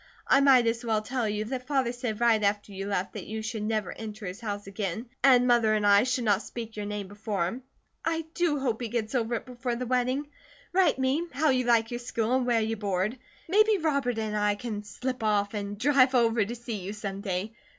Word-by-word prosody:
I 275 - +5
might 265 -3 +6
as 230 +1 0
well 220 -2 0
tell 245 -1 -1
you 210 +1 -2
that 255 +2 -5
Father 265 -4 +1
said 240 -3 -4
right 230 -2 +4
after 205 0 0
you 195 0 -5
left 195 -2 -2
that - - -7
you 220 0 -4
should 225 -1 -4
never 215 -2 -1
enter 215 -1 -7
his 185 +3 -6
house 205 -3 -4
again, 200 +3 -4 0.2
and 255 -2 +6
Mother 235 -3 +4
and 210 -1 0
I 205 +2 +6
should 255 -1 0
not 205 -2 +2
speak 230 -1 -7
your 210 -1 -4
name 205 -1 -4
before 205 -2 -2
him. 230 +9 -4 0.4
I 325 -1 -1
do 340 -4 +1
hope 250 -4 -1
he 240 - -2
gets 220 0 -3
over 235 -2 0
it - - -5
before 245 -1 -3
the 250 +1 -3
wedding. 255 +3 0 0.5
Write 370 -5 +4
me 265 +6 0
how 285 +3 +2
you 255 -1 +1
like 230 -1 +3
your 240 - -3
school, 235 -1 -1
and 255 -1 +1
where 235 -2 +3
you 220 +1 -1
board. 205 +3 -1 0.3
Maybe 425 +4 +4
Robert 280 -8 0
and 215 -1 -2
I 210 0 +2
can 210 -1 -5
slip 255 +4 -4
off 205 -1 +1
and 205 -1 -4
drive 265 +2 +4
over 230 -2 +3
to 230 +4 -5
see 235 -2 -5
you 195 +1 -6
some 200 -2 -5
day. 195 +2 -3
225 Hz, 230 wpm, -28 LUFS, 210-255 Hz, 0.5 s, might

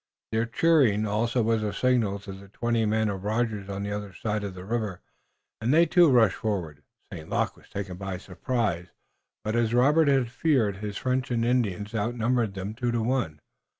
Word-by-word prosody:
Their 115 +1 0
cheering 120 -7 +3
also 115 +3 0
was 115 0 +1
a 105 -1 -1
signal 115 -2 +1
to 100 -1 -8
the 100 +1 -12
twenty 115 +2 0
men 110 +1 +1
of 100 -2 -3
Rogers 105 -2 -1
on 100 0 -4
the 100 - -3
other 105 -1 -5
side 105 +2 -2
of 100 -2 -5
the 90 0 -9
river, 110 -4 -2 0.6
and 115 +3 +1
they, 165 +3 +6
too, 175 -2 +5
rushed 115 -7 +4
forward. 85 -9 -3 0.3
St. 80 - -8
Luc - - 0
was - - -21
taken 95 -3 -5
by 95 -1 -4
surprise, 95 -2 -2 0.6
but, 110 +1 -2
as 120 0 +1
Robert 145 +5 +4
had 135 -4 +2
feared, 125 -8 +1
his 105 0 -5
French 130 0 -1
and 115 -2 0
Indians 105 -4 0
outnumbered 115 0 0
them 95 +2 -4
two 120 +1 -2
to 115 -1 0
one. 115 - -1
110 Hz, 190 wpm, -27 LUFS, 100-120 Hz, 0.6 s, they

